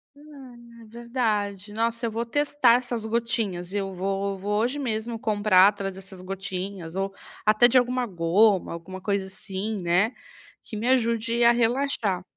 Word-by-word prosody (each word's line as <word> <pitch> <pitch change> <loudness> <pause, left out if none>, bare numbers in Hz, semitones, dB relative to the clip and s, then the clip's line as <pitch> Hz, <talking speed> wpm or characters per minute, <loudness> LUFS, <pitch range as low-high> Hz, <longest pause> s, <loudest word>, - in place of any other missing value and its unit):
Ah, 285 -4 -13 0.3
é 225 - -13
verdade, 215 -4 -2
nossa, 230 +1 -1
eu 225 - -1
vou 230 +2 -2
testar 290 -1 +3
essas 240 -2 -2
gotinhas, 220 -6 -2
eu 195 -1 -2
vou 195 +1 -2
vou 205 +2 -1
hoje 255 +5 -1
mesmo 225 -3 -3
comprar 205 -3 +4
atrás 200 -1 -2
dessas 190 0 -11
gotinhas 185 -2 -6
ou 195 0 -2 0.3
até 215 +3 +6
de 250 - +3
alguma 250 0 +2
goma, 185 +2 +2
alguma 185 +3 -8
coisa 200 0 -1
assim, 195 +3 -5
né, 180 +7 +2 0.5
que 220 - -9
me 230 +4 -2
ajude 235 -2 +1
a 235 - +7
relaxar. 235 -6 0
215 Hz, 155 wpm, -25 LUFS, 195-235 Hz, 0.5 s, a